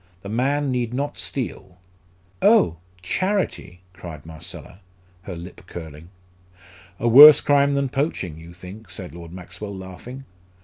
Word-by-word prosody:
The 100 Hz, -, -7 dB
man 135 Hz, +5 st, 0 dB
need 125 Hz, -1 st, -2 dB
not 140 Hz, +2 st, -3 dB
steal." 95 Hz, -8 st, -5 dB, 0.6 s
"Oh, 85 Hz, -1 st, +4 dB, 0.3 s
charity!" 185 Hz, -, -2 dB
cried 80 Hz, -6 st, -10 dB
Marcella, 80 Hz, +3 st, -9 dB, 0.4 s
her 95 Hz, -1 st, -7 dB
lip 85 Hz, +2 st, -10 dB
curling. 80 Hz, -1 st, -10 dB, 0.9 s
"A 115 Hz, -, -1 dB
worse 145 Hz, +6 st, +10 dB
crime 140 Hz, 0 st, +3 dB
than 140 Hz, 0 st, 0 dB
poaching, 130 Hz, -, -2 dB
you 85 Hz, +1 st, -12 dB
think," 90 Hz, +4 st, -12 dB
said 90 Hz, -1 st, -6 dB
Lord 85 Hz, -1 st, -10 dB
Maxwell, 95 Hz, +3 st, -8 dB
laughing. 105 Hz, +9 st, -10 dB
95 Hz, 130 wpm, -22 LUFS, 85-135 Hz, 0.9 s, worse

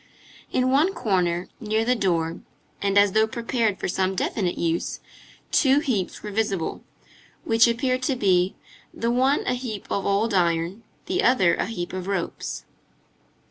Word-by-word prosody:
In 255 Hz, 0 st, +1 dB
one 315 Hz, +8 st, +3 dB
corner, 180 Hz, -6 st, 0 dB
near 220 Hz, 0 st, 0 dB
the 250 Hz, -, +3 dB
door, 170 Hz, -7 st, 0 dB, 0.4 s
and 200 Hz, 0 st, +1 dB
as 200 Hz, -1 st, +6 dB
though 220 Hz, +2 st, +3 dB
prepared 230 Hz, -2 st, -1 dB
for -, -, -2 dB
some 190 Hz, +1 st, 0 dB
definite 185 Hz, -1 st, -1 dB
use, 165 Hz, 0 st, -1 dB, 0.5 s
two 275 Hz, -1 st, +4 dB
heaps 215 Hz, -, -2 dB
were 210 Hz, -, -5 dB
visible, 200 Hz, -5 st, -1 dB, 0.6 s
which 225 Hz, +1 st, +4 dB
appeared 255 Hz, +2 st, 0 dB
to 260 Hz, +1 st, 0 dB
be, 185 Hz, -5 st, +2 dB, 0.4 s
the 230 Hz, +1 st, -1 dB
one 260 Hz, +4 st, +2 dB
a -, -, +1 dB
heap 245 Hz, -5 st, -5 dB
of 200 Hz, -, -1 dB
old 205 Hz, +3 st, +1 dB
iron, 170 Hz, +2 st, +1 dB, 0.2 s
the 370 Hz, +1 st, 0 dB
other 195 Hz, -9 st, +4 dB
a -, -, -1 dB
heap 180 Hz, -6 st, -5 dB
of 185 Hz, 0 st, -5 dB
ropes. 195 Hz, -4 st, -3 dB
210 Hz, 155 wpm, -24 LUFS, 185-245 Hz, 0.6 s, as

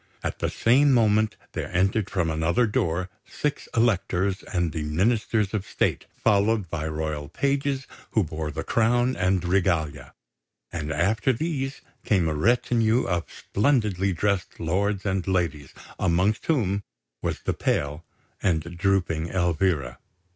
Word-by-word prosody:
At -, -, -3 dB
the -, -, 0 dB
same 135 Hz, +5 st, +4 dB
moment 110 Hz, -2 st, +3 dB, 0.2 s
there -, -, -4 dB
entered 95 Hz, +3 st, +1 dB
from 85 Hz, -4 st, 0 dB
another 80 Hz, +10 st, +2 dB
door 90 Hz, -6 st, 0 dB, 0.2 s
six 150 Hz, -1 st, -3 dB
Electors 100 Hz, -4 st, +1 dB
and 85 Hz, -4 st, 0 dB
the 80 Hz, 0 st, -3 dB
Ministers 105 Hz, +6 st, +1 dB
of 105 Hz, -3 st, -1 dB
State, -, -, -1 dB
followed 105 Hz, -3 st, +2 dB
by 80 Hz, -1 st, -2 dB
royal 75 Hz, -2 st, -3 dB
pages 140 Hz, -1 st, 0 dB, 0.3 s
who 110 Hz, -, +3 dB
bore 80 Hz, -1 st, -4 dB
the 75 Hz, +2 st, -4 dB
crown 120 Hz, +3 st, +2 dB
and 95 Hz, -1 st, +1 dB
regalia; 80 Hz, -7 st, 0 dB, 0.6 s
and 75 Hz, -3 st, -3 dB
after 95 Hz, -, +2 dB
these 135 Hz, 0 st, -3 dB, 0.2 s
came 95 Hz, -6 st, +2 dB
a 80 Hz, -, 0 dB
retinue 115 Hz, +6 st, +2 dB
of 85 Hz, -2 st, -2 dB
splendidly 105 Hz, -5 st, +1 dB
dressed 100 Hz, +1 st, -1 dB
lords 95 Hz, +4 st, 0 dB
and 95 Hz, -2 st, -1 dB
ladies, 85 Hz, -7 st, -1 dB, 0.3 s
amongst 95 Hz, +4 st, +1 dB
whom 105 Hz, -, +1 dB, 0.4 s
was -, -, -2 dB
the -, -, -1 dB
pale 75 Hz, +3 st, -1 dB, 0.4 s
and 85 Hz, -1 st, -1 dB
drooping 90 Hz, -4 st, +1 dB
Elvira. 85 Hz, -7 st, 0 dB
95 Hz, 135 wpm, -25 LUFS, 80-110 Hz, 0.6 s, same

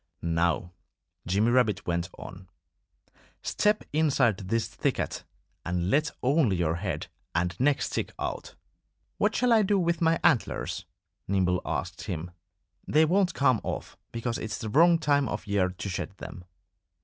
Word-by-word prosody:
"Now," 85 Hz, +1 st, 0 dB, 0.6 s
Jimmy 100 Hz, +6 st, +2 dB
Rabbit 120 Hz, -4 st, +2 dB
went 85 Hz, 0 st, -1 dB
on, 90 Hz, 0 st, -10 dB, 0.9 s
"step 210 Hz, 0 st, +1 dB
inside 140 Hz, -9 st, +3 dB
this 110 Hz, +4 st, -1 dB
thicket -, -, -2 dB, 0.4 s
and 90 Hz, +1 st, -1 dB
let 150 Hz, +1 st, +3 dB
only 130 Hz, -, +3 dB
your 85 Hz, -1 st, 0 dB
head 85 Hz, -5 st, -3 dB, 0.3 s
and 90 Hz, +1 st, 0 dB
neck 140 Hz, +2 st, +3 dB
stick -, -, -2 dB
out!" -, -, -5 dB, 0.6 s
"What -, -, +2 dB
shall 250 Hz, -1 st, +3 dB
I 220 Hz, -, +6 dB
do 205 Hz, 0 st, +2 dB
with 170 Hz, -2 st, 0 dB
my 165 Hz, 0 st, +3 dB
antlers?" 130 Hz, -9 st, +1 dB, 0.4 s
Nimble 90 Hz, -2 st, +1 dB
asked -, -, -3 dB
him. 85 Hz, 0 st, -4 dB, 0.6 s
"They 155 Hz, +2 st, +4 dB
won't 180 Hz, +1 st, +2 dB
come 130 Hz, -5 st, +3 dB
off, -, -, -5 dB, 0.2 s
because 115 Hz, 0 st, -3 dB
it's 110 Hz, 0 st, -4 dB
the 115 Hz, -4 st, -5 dB
wrong 170 Hz, +7 st, +6 dB
time 145 Hz, -4 st, +2 dB
of 105 Hz, -, -4 dB
year 100 Hz, -2 st, +1 dB
to 90 Hz, +2 st, -6 dB
shed 95 Hz, 0 st, -4 dB
them." 90 Hz, -1 st, -9 dB
110 Hz, 150 wpm, -28 LUFS, 90-150 Hz, 0.9 s, I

